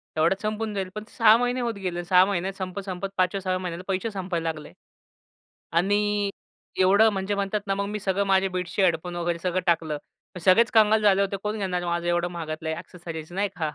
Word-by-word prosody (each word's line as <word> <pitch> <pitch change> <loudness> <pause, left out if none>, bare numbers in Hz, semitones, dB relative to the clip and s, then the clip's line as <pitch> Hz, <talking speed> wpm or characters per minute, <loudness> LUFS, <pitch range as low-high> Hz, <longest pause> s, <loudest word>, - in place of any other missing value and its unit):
तेवढ्यात 165 +5 +2
संपून 215 0 -2
जाईल. 190 -2 -3
पण 210 - -5
6 220 -2 +7
महिने 245 +1 0
होत 235 -1 -1
गेले. 175 -1 -2
6 180 +1 +6
महिन्यात 195 -1 -2
संपत-संपत 190 0 -4
5-6 185 +1 0
व्या 185 - 0
महिन्याला 180 -1 -5
पैसे 195 +3 -1
संपायला 180 -4 -2
लागले 155 -1 -11 1.0
आणि 205 +3 +1 0.5
एवढं 200 +4 +6
म्हणजे 195 +1 -2
म्हणतात 200 +1 -1
ना, 195 - +1
मग 200 0 -2
मी 210 +1 -3
सगळं 195 0 0
माझ्या 195 0 +3
बीट्स 180 +1 -4
हेडफोन 175 -1 +1
वगैरे 175 0 -1
सगळं 185 0 0
टाकलं. 165 -3 +1 0.4
मग 180 - -6
सगळेच 225 +6 +5
कंगाल 220 0 +5
झाले 200 -1 +4
होते. 200 0 -1
कोण 210 +1 -2
घेणार 180 -3 -2
माझं 170 0 -1
एवढं 175 0 +1
महागातलं 160 -2 -5
आहे 160 - -1
ॲक्सेसरीज, 170 -2 -8
नाही 200 +2 0
का. 155 -3 -1
190 Hz, 195 wpm, -25 LUFS, 175-205 Hz, 1.0 s, 6